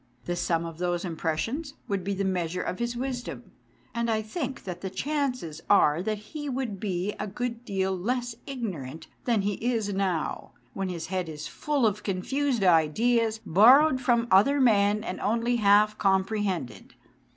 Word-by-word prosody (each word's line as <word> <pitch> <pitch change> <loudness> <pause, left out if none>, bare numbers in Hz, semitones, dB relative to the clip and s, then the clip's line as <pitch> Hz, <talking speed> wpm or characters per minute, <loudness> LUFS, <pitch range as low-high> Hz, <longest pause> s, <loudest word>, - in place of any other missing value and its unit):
The 175 - -2
sum 170 -1 0
of 165 -1 -8
those 175 0 -1
impressions 180 - -3
would 195 -2 -2
be 200 +1 -2
the 195 +1 -1
measure 180 -2 -1
of 185 - -4
his 235 0 -2
wisdom, 250 -1 -5 0.4
and 235 0 -1
I 220 -1 +1
think 265 +4 -4
that 180 -2 -6
the 190 - -3
chances 250 - -2
are 160 -5 +5
that 215 +3 -1
he 290 +8 -7
would 250 -7 -3
be 190 -1 -2
a 210 - -2
good 235 +3 -4
deal 190 -2 -1
less 245 +6 -2
ignorant 180 - -5 0.2
than 230 -5 +2
he 205 +1 -2
is 225 -4 0
now, 190 -5 -2 0.2
when 195 -1 -3
his 170 -2 -4
head 180 -3 -1
is 150 -1 -7
full 290 -5 -1
of 210 -1 +1
confused 240 +6 -1
ideas 220 +7 +3
borrowed 255 - +6
from 240 -2 +2
other 245 +10 +5
men 210 -4 +3
and 185 - -5
only 235 +3 +1
half 210 0 +4
comprehended. 190 - -1
205 Hz, 165 wpm, -27 LUFS, 180-240 Hz, 0.4 s, borrowed